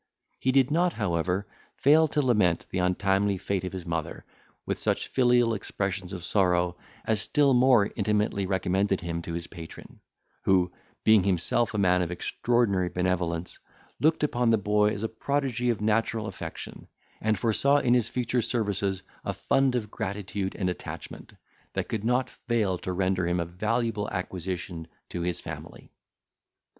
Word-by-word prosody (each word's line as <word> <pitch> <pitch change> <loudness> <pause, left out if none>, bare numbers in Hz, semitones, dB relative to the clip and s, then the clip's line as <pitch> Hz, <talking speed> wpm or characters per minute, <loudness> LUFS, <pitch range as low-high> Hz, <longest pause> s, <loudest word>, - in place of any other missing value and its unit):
He 130 - +2
did 135 0 +3
not, 175 +2 +2
however, 90 -1 -1 0.3
fail 155 +3 +5
to 150 -1 0
lament 105 -9 +2
the 95 - -1
untimely 95 +2 +1
fate 95 0 -2
of 90 - -4
his 90 -2 -6
mother, 80 -2 -4 0.4
with - - -2
such - - 0
filial 120 -2 +3
expressions 95 -2 -3
of 90 -3 -6
sorrow, 90 -2 +2 0.3
as 110 -2 +2
still 145 +2 +3
more 125 -4 +5
intimately 105 -2 0
recommended 95 +1 +1
him 85 -1 -3
to 85 0 -6
his 85 0 -4
patron; 85 -1 -11 0.4
who, 90 -2 +3 0.3
being 110 -2 +6
himself 100 +5 +1
a - - 0
man 90 -2 +3
of 85 - -1
extraordinary 100 0 +1
benevolence, 90 -2 -1 0.4
looked 155 +1 +2
upon 125 -5 +2
the 115 - +5
boy 105 +1 +2
as 105 0 -4
a - - +1
prodigy 125 +1 -1
of 115 -3 0
natural 110 +1 +1
affection, 90 -5 -7 0.3
and 110 -1 +1
foresaw 130 +7 +3
in 125 -4 +3
his 120 -2 +2
future 125 0 0
services 100 -4 -1 0.2
a - - -2
fund 135 -2 +1
of 105 -4 -2
gratitude 95 0 -3
and 95 - -1
attachment, 90 - -6 0.4
that - - -3
could 110 -2 -2
not 125 +2 +2 0.2
fail 105 -7 +1
to 95 - -4
render 90 -1 0
him 90 +1 +1
a 85 - 0
valuable 110 +4 -1
acquisition 90 -2 -4 0.2
to 85 - -4
his 90 0 -1
family. - - -9
100 Hz, 160 wpm, -27 LUFS, 90-120 Hz, 0.4 s, being